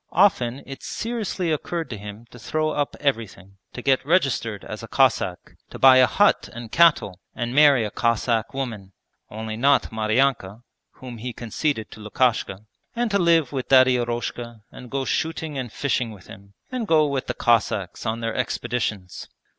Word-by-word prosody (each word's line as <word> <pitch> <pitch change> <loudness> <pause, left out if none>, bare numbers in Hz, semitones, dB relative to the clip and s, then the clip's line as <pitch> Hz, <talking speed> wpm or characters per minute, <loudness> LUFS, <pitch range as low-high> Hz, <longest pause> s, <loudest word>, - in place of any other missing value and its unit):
Often 140 -9 +2
it 135 0 -9
seriously 215 -7 -3
occurred 165 +2 -3
to 110 - -5
him 105 +3 -9
to 120 - -13
throw 155 +7 -1
up 145 -1 -2
everything, 105 -8 -3
to 125 - -8
get 135 -1 +2
registered 135 - 0
as 110 - -7
a 115 - -8
Cossack, 115 -10 0
to - - -9
buy 130 -1 +7
a 130 -1 +6
hut 205 +9 +2
and 120 -1 -9
cattle 165 - +3 0.2
and 120 0 -3
marry 140 -5 +5
a 105 - -5
Cossack 115 -1 0
woman 110 -8 -5 0.4
(only 110 0 -6
not 140 +5 +2
Maryanka, 110 -1 0 0.3
whom 125 -3 -10
he 125 +2 -5
conceded 120 0 -3
to - - -12
Lukashka), 105 -2 -1 0.3
and 240 -1 -1
to 200 - +2
live 165 -6 +3
with 135 -3 -4
Daddy 130 -1 +6
Eroshka 120 -1 -4
and 125 - -11
go 135 +1 -2
shooting 160 0 -2
and 125 -3 -5
fishing 125 -2 -1
with 100 -5 -13
him, 100 0 -14 0.2
and 250 -4 -3
go 155 -3 +4
with 140 -3 -2
the - - -3
Cossacks 105 -6 0
on 115 +1 -3
their 115 -1 -2
expeditions. 100 -6 -3
125 Hz, 170 wpm, -23 LUFS, 110-145 Hz, 0.4 s, buy